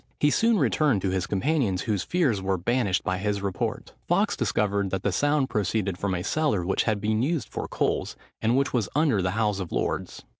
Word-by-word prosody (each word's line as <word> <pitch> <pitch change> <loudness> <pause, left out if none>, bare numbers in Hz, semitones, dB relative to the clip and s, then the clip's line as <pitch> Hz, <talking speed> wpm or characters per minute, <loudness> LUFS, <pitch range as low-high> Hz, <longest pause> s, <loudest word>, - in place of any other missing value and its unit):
He 150 - +3
soon 230 +5 +3
returned 145 - +2
to 95 - +1
his 95 +1 -1
companions, 105 - 0
whose 105 -5 0
fears 135 - +1
were 95 0 0
banished 100 0 0
by 95 0 -1
his 100 0 -1
report. 95 -2 -3
Fawkes 200 +4 +2
discovered 100 -3 0
that 95 0 -3
the 100 - +1
sound 145 +6 +1
proceeded 100 -3 0
from 95 +1 -2
a 90 - -3
cellar, 140 - 0
which 95 - +1
had 110 -2 +1
been 110 +1 0
used 140 - -1
for - - -4
coals, - - -1 0.3
and 115 +3 +2
which 140 +1 0
was 115 -6 0
under 145 -10 +3
the 90 +3 -1
House 105 -3 +1
of 90 -4 -5
Lords. - - -2
105 Hz, 210 wpm, -26 LUFS, 95-140 Hz, 0.3 s, He